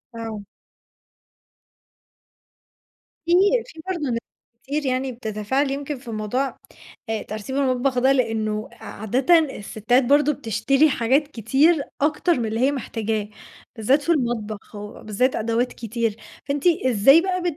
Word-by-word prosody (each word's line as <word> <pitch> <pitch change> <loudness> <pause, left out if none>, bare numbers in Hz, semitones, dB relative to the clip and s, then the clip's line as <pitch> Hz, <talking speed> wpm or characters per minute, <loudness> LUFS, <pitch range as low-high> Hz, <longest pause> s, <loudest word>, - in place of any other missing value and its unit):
آه. 225 -2 -5 2.8
فيه 340 - +2 0.3
فيه 325 -9 -12
برضه 330 -7 -2
ناس 230 -1 0 0.4
كتير 290 +2 -2
يعني 260 0 -1
بتتفاعل 240 +4 -2
يمكن 280 +1 -4
في 250 - -17
الموضوع 230 +5 -2 0.5
آآ 220 -1 -1
ترتيب 215 +5 -6
المطبخ 260 -1 +1
ده، 260 +2 +4
لإنه 220 -4 0
عادةً 255 - +1
السِّتات 245 -3 0
برضه 290 +3 +4
بتشتري 275 +4 +2
حاجات 265 +3 +2
كتير، 285 - +2 0.2
أكتر 310 +2 +2
من 235 - -1
اللي 220 +1 -2
هي 265 +3 +3
محتاجاه، 220 -5 -3 0.5
بالذات 255 +6 +2
في 335 - 0
المطبخ، 225 - -2
وبالذات 210 +4 -2
أدوات 230 +3 0
كتير، 230 -1 -2 0.3
فأنتِ 280 0 -2
إزاي 270 - +5
بقى 365 0 -2
255 Hz, 125 wpm, -23 LUFS, 220-280 Hz, 2.8 s, إزاي